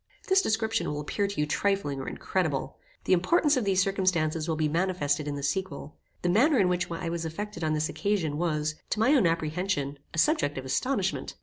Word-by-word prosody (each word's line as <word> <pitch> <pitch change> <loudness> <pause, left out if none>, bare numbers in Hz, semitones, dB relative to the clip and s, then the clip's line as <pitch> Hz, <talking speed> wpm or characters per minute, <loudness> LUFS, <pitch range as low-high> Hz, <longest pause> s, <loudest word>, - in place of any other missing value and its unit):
This 380 0 +5
description 220 - 0
will 150 - -3
appear 200 +7 -1
to 200 -5 -5
you 150 - +2
trifling 150 -4 0
or 135 - -6
incredible. 145 -8 -2 0.2
The - - +2
importance 295 - +3
of 250 -5 0
these 190 -2 +3
circumstances 175 -5 0
will 160 - +1
be 155 0 +1
manifested 155 -3 0
in 145 - -2
the 140 - -5
sequel. 160 0 -3 0.3
The - - +1
manner 260 - +4
in 190 -5 +3
which 180 0 -1
I 170 0 -4
was 170 0 -3
affected 170 +2 -5
on 155 -1 +1
this 155 0 0
occasion, 170 -8 -1
was, 155 -3 0 0.2
to - - -1
my 240 +6 +4
own 245 - +4
apprehension, 160 -3 -1
a - - -9
subject 165 - +2
of 130 - -5
astonishment. 190 - -1
175 Hz, 205 wpm, -28 LUFS, 150-200 Hz, 0.3 s, This